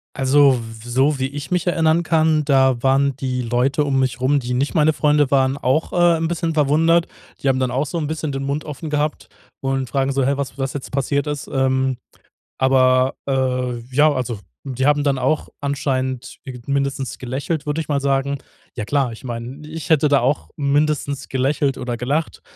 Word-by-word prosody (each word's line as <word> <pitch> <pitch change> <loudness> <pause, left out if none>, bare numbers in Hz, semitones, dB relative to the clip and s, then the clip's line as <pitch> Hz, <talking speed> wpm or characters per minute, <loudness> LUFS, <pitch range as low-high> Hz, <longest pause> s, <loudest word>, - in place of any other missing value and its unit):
Also, 135 0 +4
w 115 -1 -10
so 135 +4 +2
wie 130 - 0
ich 140 0 -7
mich 180 0 0
erinnern 165 -1 +3
kann, 160 -2 +2
da 130 -4 +3
waren 135 +1 +2
die 130 -2 -2
Leute 125 +5 +1
um 140 -2 +1
mich 130 -1 0
rum, 140 +3 +2
die 125 -1 -3
nicht 135 +3 0
meine 155 -2 +4
Freunde 150 -2 +2
waren, 135 -1 +2
auch, 140 +3 0
äh, 175 -1 +4
'n 165 0 -1
bisschen 170 -1 -2
verwundert. 160 +3 +3 0.4
Die - - 0
haben 130 -1 +2
dann 130 -1 0
auch 135 +4 0
so 170 - -4
'n 150 - -2
bisschen 155 -1 -3
den 135 0 -3
Mund 140 +2 -2
offen 150 +1 -6
gehabt 150 0 -2 0.3
und 135 -1 -1
fragen 135 +3 0
so: 135 -1 +1
„Hä, 140 - +2
was 140 0 -5
was 135 -1 -2
jetzt 140 - -6
passiert 140 +2 0
ist“? 145 -1 -4
Ähm, 130 -1 +1 0.6
aber, 130 0 +3
äh, 125 -2 -1 0.2
ja 150 +2 +5
also 125 -6 -3 0.3
die 130 0 -1
haben 145 0 +3
dann 140 -2 +2
auch 130 +4 0
anscheinend 130 -2 -2 0.3
mindestens 140 -1 -2
gelächelt, 140 +5 -3
würde 150 +1 -1
ich 160 - -4
mal 140 -2 0
sagen. 140 0 0 0.4
Ja 115 - -3
klar, 135 +1 0
ich 115 - -12
meine, 125 +4 -6
ich 160 +2 -7
hätte 155 -2 +4
da 140 -1 +4
auch 135 +4 0
mindestens 145 -1 0
gelächelt 135 +1 0
oder 125 -1 -3
gelacht, 140 +7 -2
140 Hz, 195 wpm, -20 LUFS, 130-150 Hz, 0.6 s, ja